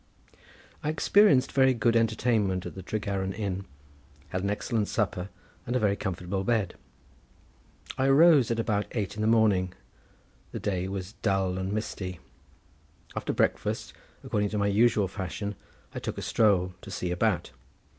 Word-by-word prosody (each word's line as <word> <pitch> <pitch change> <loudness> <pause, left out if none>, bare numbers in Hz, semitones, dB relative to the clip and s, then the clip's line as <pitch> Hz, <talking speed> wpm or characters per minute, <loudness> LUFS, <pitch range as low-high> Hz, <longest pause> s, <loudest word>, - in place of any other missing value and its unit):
I 150 - 0
experienced 160 -2 +4
very 130 -1 +4
good 115 0 +2
entertainment 110 -4 +1
at - - -6
the 95 - -8
Tregaron 95 -1 -2
Inn, 95 -2 -3 0.6
had 95 - -2
an 100 - -1
excellent 105 +1 -1
supper 95 -3 -1 0.4
and 120 - -1
a - - +3
very 100 -3 +2
comfortable 95 0 -3
bed. 105 -4 0 1.3
I 130 - +3
arose 145 -2 +6
at 115 -1 0
about 105 -2 0
eight 105 -5 -2
in 105 - -4
the 110 - +1
morning. 105 -5 +3 0.8
The - - -3
day 95 -2 -1
was 95 +1 -5
dull 95 -4 0
and 95 +1 -3
misty. 95 -4 -4 1.0
After - - -2
breakfast, - - -1 0.3
according 105 -1 0
to 105 - -3
my 100 - +1
usual 105 0 +3
fashion, 100 +2 -4 0.4
I - - -4
took - - -5
a - - -4
stroll 95 -5 +2
to - - -10
see 90 -2 -3
about. 90 - 0
100 Hz, 155 wpm, -28 LUFS, 95-115 Hz, 1.3 s, arose